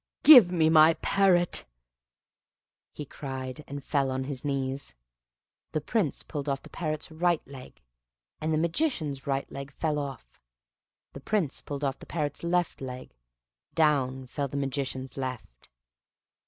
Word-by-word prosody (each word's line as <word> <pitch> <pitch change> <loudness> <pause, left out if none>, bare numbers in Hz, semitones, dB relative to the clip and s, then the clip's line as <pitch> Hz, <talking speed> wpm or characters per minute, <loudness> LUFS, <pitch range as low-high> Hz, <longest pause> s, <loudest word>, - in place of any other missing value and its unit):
"Give 245 - +10
me 165 -3 +3
my 160 0 +6
parrot!" 185 -3 +3 1.5
cried 130 -2 -6
he, - - -9
and 140 0 -7
fell 140 -2 0
on 130 0 -2
his 130 -1 -4
knees. 135 -1 -2 0.8
The 155 - +1
Prince 180 - -1
pulled 145 -2 -5
off 135 -1 -2
the - - -14
parrot's 155 -1 -4
right 170 +1 0
leg, 130 - -12 0.6
and 155 +1 -2
the 155 - +2
Magician's 160 - -1
right 135 0 0
leg 140 0 -7
fell 150 +1 -1
off: 135 - -8 0.7
the - - -8
Prince 180 -5 -1
pulled 145 0 -6
off 135 -1 -1
the - - -12
parrot's 150 -3 -3
left 175 -2 0
leg, 130 -1 -7 0.6
down 135 -5 +2
fell 140 +3 -3
the 140 - -5
Magician's 135 -1 -3
left. 130 - -6
140 Hz, 140 wpm, -28 LUFS, 135-160 Hz, 1.5 s, Give